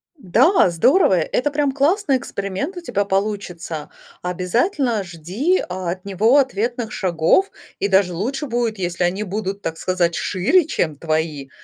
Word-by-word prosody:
Да, 260 - +3
здорово. 255 - +4
Это 185 - 0
прям 290 -1 +1
классный 290 +2 +2
эксперимент 200 - -4
у 355 - -6
тебя 220 -11 -1
получится. 190 -6 -3 0.3
Обязательно 220 - 0
жди 185 - -1
от 185 0 -4
него 210 +7 +3
ответных 240 -2 -1
шагов, 180 - +2 0.3
и - - +1
даже 190 -2 +3
лучше 265 - -3
будет, 235 -3 -1
если 175 -1 -2
они 180 +4 0
будут, 200 0 -4
так 165 - -4
сказать, 175 -2 0
шире, 245 - +2
чем 160 - -1
твои. 155 -3 -2
200 Hz, 140 wpm, -20 LUFS, 180-265 Hz, 0.3 s, здорово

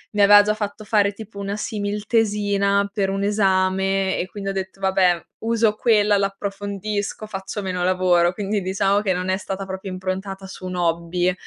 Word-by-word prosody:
mi 205 - +3
aveva 205 +1 +8
già 210 +1 +1
fatto 215 0 -5
fare 205 -2 +3
tipo 205 0 -10
una 200 +1 -3
simil-tesina 205 -1 0
per 195 -2 0
un 195 0 -2
esame 190 -1 +1
e 180 - -2
quindi 195 0 -6
ho - - -2
detto: 190 0 -5
"Vabbè, 190 -3 +2 0.2
uso 225 -1 +1
quella, 210 -2 +3
l'approfondisco, 200 +1 -3
faccio 195 +1 -5
meno 185 -2 -2
lavoro". 180 -1 +3
Quindi 205 +2 -2
diciamo 195 +2 +1
che 200 -2 0
non 180 0 -2
è 185 - +2
stata 195 0 -5
proprio 190 0 -6
improntata 190 +1 -4
su 190 -1 -9
un 185 - -4
hobby 175 +1 0
195 Hz, 175 wpm, -22 LUFS, 190-205 Hz, 0.2 s, aveva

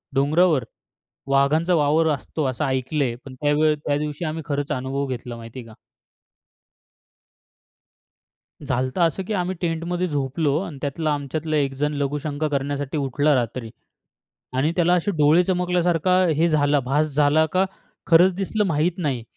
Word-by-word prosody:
डोंगरावर 150 +1 +3 0.7
वाघांचा 145 +6 +2
वावर 155 +1 +3
असतो 150 +2 -4
असं 130 +4 -2
ऐकलंय, 130 -1 -1
पण 135 - -9
त्यावेळ 150 +3 +2
त्या 145 - +1
दिवशी 150 +2 -4
आम्ही 160 +1 -4
खरंच 145 0 -2
अनुभव 135 +1 -2
घेतला 120 -2 -5
माहिती 115 +2 -9
आहे 120 - -10
का. 110 - -14 2.9
झालंत 130 +3 -2
असं 170 +2 +1
की 220 - -2
आम्ही 185 -1 -1
टेंटमध्ये 175 +1 -1
झोपलो 145 0 0
आणि 165 -7 -7
त्यातला 150 +2 -1
आमच्यातला 155 +2 -3
1 140 -2 +1
जण 150 +2 -1
लघुशंका 145 +1 -2
करण्यासाठी 145 0 -2
उठला 145 +2 +1
रात्री. 120 -1 -2 0.9
आणि 140 +4 +2
त्याला 175 0 +3
असे 180 +3 0
डोळे 150 +3 +5
चमकल्यासारखा 180 -1 +1 0.2
हे 165 +3 +3
झाला 145 -2 +2
भास 140 +4 +1
झाला 150 +2 +4
का, 185 +1 +3 0.4
खरंच 175 +2 +5
दिसलं 200 +3 -1
माहीत 165 +2 0
नाही. 140 -9 -2
150 Hz, 145 wpm, -23 LUFS, 140-165 Hz, 2.9 s, डोळे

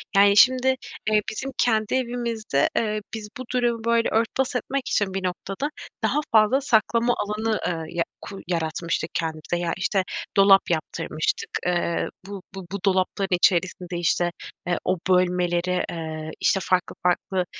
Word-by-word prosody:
Yani, 200 +1 +6
şimdi, 255 +5 +6 0.4
eee, 215 -1 +4
bizim 265 +5 -4
kendi 220 -2 +2
evimizde, 235 - 0
eee, 215 -1 0
biz 215 -2 -6
bu 255 - -5
durumu 240 -2 +1
böyle 235 0 +3
örtbas 235 +4 0
etmek 270 +1 -2
için 200 -2 +1
bir 195 - -2
noktada 190 +8 -3 0.3
daha 295 - +2
fazla 220 +5 +5
saklama 235 -1 +2
alanı, 215 +1 -1
ııı, 165 -2 -3
ya 170 -1 0 0.2
ku 195 - -8
yaratmıştık 170 -1 -2
kendimize. 160 +1 -2
Ya, 165 - 0
işte, 190 0 +1 0.3
dolap 195 0 +6
yaptırmıştık. 155 -1 -2 0.2
Eee, 175 -1 0 0.2
bu 200 -1 -7
bu 190 -2 -7
bu 200 - -3
dolapların 190 0 +1
içerisinde, 180 0 +1
işte, 175 0 +1 0.4
eee, 175 -1 +1
o 185 - +1
bölmeleri, 180 0 +2
eee, 160 -1 -5
işte, 195 - +2
farklı 185 -1 0
farklı 180 +1 +1
195 Hz, 145 wpm, -24 LUFS, 175-225 Hz, 0.4 s, Yani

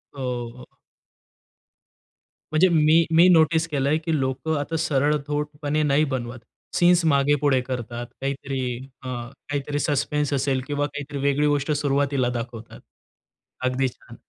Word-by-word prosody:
हो, 135 - -7 0.4
हो. 125 - -11 1.9
म्हणजे 155 +4 +4
मी 160 0 +4
मी 170 +2 +7
नोटीस 160 -1 +4
केलंय, 145 0 +1
की 160 -1 -1
लोकं 135 +4 -1
आता 145 +3 -3
सरळसोटपणे 150 0 -1
नाही 145 +1 +3
बनवत, 120 -1 -4 0.4
सीन्स 175 0 +4
मागे-पुढे 145 -2 +3
करतात, 120 -1 -5 0.2
काहीतरी 135 0 -3 0.4
हं, 120 -2 -5 0.2
काहीतरी 145 0 -2
सस्पेंस 145 0 0
असेल 135 -1 0
किंवा 145 0 -1
काहीतरी 145 0 -6
वेगळी 145 +1 +2
गोष्ट 145 +1 0
सुरुवातीला 140 -3 +1
दाखवतात. 115 -1 -8 0.9
अगदी 130 +1 +1
छान. 120 -1 -16
145 Hz, 120 wpm, -24 LUFS, 135-150 Hz, 1.9 s, मी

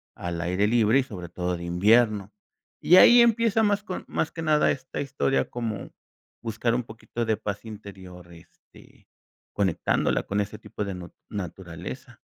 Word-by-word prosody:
al 85 -1 -4
aire 90 +4 +1
libre 115 +2 +4
y - - +1
sobre 90 -8 -8
todo 90 0 -2
de 85 - -8
invierno. 105 +3 +3 0.5
Y 180 - +6
ahí 240 +5 +9
empieza 230 -1 +3
más 205 0 +1
con 185 -3 -5
más 160 - -2
que 165 - -7
nada 155 -1 +3
esta 130 0 -5
historia 135 -1 0
como 110 -5 -5 0.5
buscar 115 +1 -1
un 125 - -1
poquito 115 +1 -6
de 110 -1 +1
paz 100 0 -5
interior, 95 -5 -11
este, 85 - -19 0.5
conectándola 95 -5 +1
con 100 +1 -1
ese 100 - -6
tipo 105 - -6
de 100 - -4
nut 90 -1 -10 0.2
naturaleza. 95 - -7
110 Hz, 160 wpm, -26 LUFS, 90-130 Hz, 0.5 s, ahí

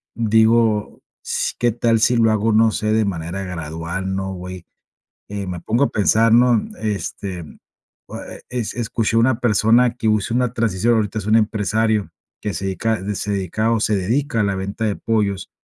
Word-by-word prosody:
digo, 110 -1 +2 0.2
s - - -2
qué 120 0 +2
tal 115 0 +1
si 120 +2 +3
lo 115 -1 +4
hago 110 +1 +1
no 110 +1 +4
sé, 110 0 -1
de 110 -1 +2
manera 90 +1 -4
gradual, 85 +2 -4
¿no? 95 0 -3
Güey, 90 -1 -8 0.6
eh, 100 -1 -5
me 90 -1 -4
pongo 120 +10 +1
a - - -2
pensar, 110 +2 +3
¿no? 120 -1 +5 0.2
Este, 95 -3 -4 0.6
oh, - - -9
ah, - - -7
e - - -14 0.2
es 115 - -3
escuché 115 -1 -1
una 120 +1 +3
persona 120 +1 +3
que 115 -3 -2
usó 110 +1 +1
una 125 -1 0
transición, 115 -1 +1
ahorita 110 0 -1
es 100 - -7
un 110 +1 +3
empresario 110 -1 +1 0.3
que 105 - -3
se 95 - -4
dedica 105 +2 -1
se 105 +2 -3
dedica 100 +3 -1
o 115 - +2
se 105 - +1
dedica 115 +6 -1
a - - +2
la 100 -1 0
venta 100 +4 -3
de 105 - 0
pollos. 105 -4 -1
110 Hz, 190 wpm, -20 LUFS, 95-115 Hz, 0.6 s, no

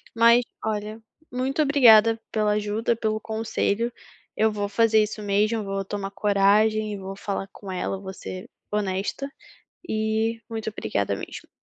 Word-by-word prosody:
Mas 235 +1 +6 0.2
olha, 215 +1 -3 0.3
muito 260 +4 0
obrigada 230 -6 +6
pela 215 -1 +1
ajuda, 210 +2 0
pelo 215 -1 -1
conselho, 220 +1 -1 0.5
eu 220 0 +3
vou 205 -1 -2
fazer 220 0 +4
isso 215 0 -5
mesmo, 210 +2 +1
vou 195 0 -3
tomar 195 0 -4
coragem 210 +2 +3
e 205 - -4
vou 195 0 -7
falar 195 0 -4
com 195 -2 -9
ela, 190 +1 -2
vou 190 -1 -7
ser 185 -1 -8 0.2
honesta 205 +6 -2 0.6
e 220 +1 0
muito 220 -1 -3
obrigada 100 - -2
mesmo. - - -8
215 Hz, 145 wpm, -25 LUFS, 200-225 Hz, 0.6 s, Mas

